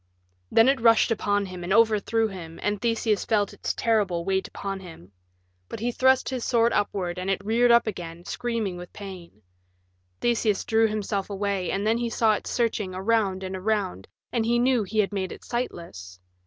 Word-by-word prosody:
Then 225 +2 +6
it 270 -2 +2
rushed 230 0 +5
upon 205 -2 +1
him 185 -2 -8
and 175 - -4
overthrew 225 +1 +3
him, 170 -5 -9
and 205 -1 -1
Theseus 225 -2 +1
felt 205 -2 +1
its - - -3
terrible 200 -7 +1
weight 190 0 0
upon 195 -1 -5
him. 165 - -12 0.6
But - - -6
he 240 +3 -1
thrust 260 +2 +3
his 255 -3 -3
sword 235 -1 +2
upward, 185 -4 -1
and 185 +1 -3
it 195 +1 -1
reared 235 +3 +3
up 235 0 +6
again, 175 -5 -6
screaming 230 -6 -3
with 175 0 -9
pain. 180 - -10 0.8
Theseus 225 -4 +1
drew 225 0 +3
himself 210 -2 -2
away, 200 -2 -2
and 195 +2 -1
then 225 +2 +2
he 240 -1 -1
saw 225 -1 +3
it - - -4
searching 215 -6 -1
around 195 -1 0
and 190 0 -4
around, 190 - -2 0.2
and 235 - 0
he 235 +1 +2
knew 250 0 +3
he 210 +2 -5
had 210 -1 +2
made 190 -2 -2
it - - -10
sightless. 170 - -5
205 Hz, 185 wpm, -25 LUFS, 185-230 Hz, 0.8 s, Then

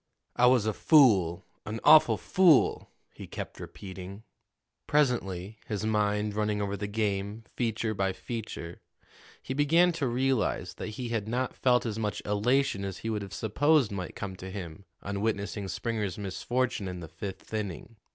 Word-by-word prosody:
"I 125 - +5
was 125 -4 +4
a 110 - +1
fool 100 - +4 0.2
an 110 +2 -5
awful 155 +1 +7
fool!" 175 -7 +4 0.2
he - - -10
kept - - -7
repeating. 95 +2 -9 0.6
Presently, 110 -8 0
his 105 -1 -2
mind 105 -1 +1
running 105 0 0
over 100 0 -1
the 100 +1 -4
game, 105 0 -2
feature 115 -2 -1
by 95 -2 0
feature, 100 -5 -6 0.6
he 130 - -4
began 165 +6 +4
to 160 -5 -2
realize 130 -1 0
that - - -5
he 125 -2 -4
had 110 -3 -2
not 125 +3 -1
felt 125 -1 +2
as 110 -1 -3
much 105 -2 -2
elation 105 +1 +1
as 95 -2 -4
he 115 - 0
would 105 -1 -2
have 100 -1 -7
supposed 120 +5 +2
might 95 -3 -5
come 95 -2 -5
to 95 - -8
him 95 -2 -7 0.2
on 100 0 -3
witnessing 105 -2 -2
Springer's 105 +1 -3
misfortune 110 +3 -2
in 90 -1 -5
the 80 - -7
fifth 95 +7 -8
inning. 105 +1 -4
105 Hz, 160 wpm, -29 LUFS, 100-125 Hz, 0.6 s, awful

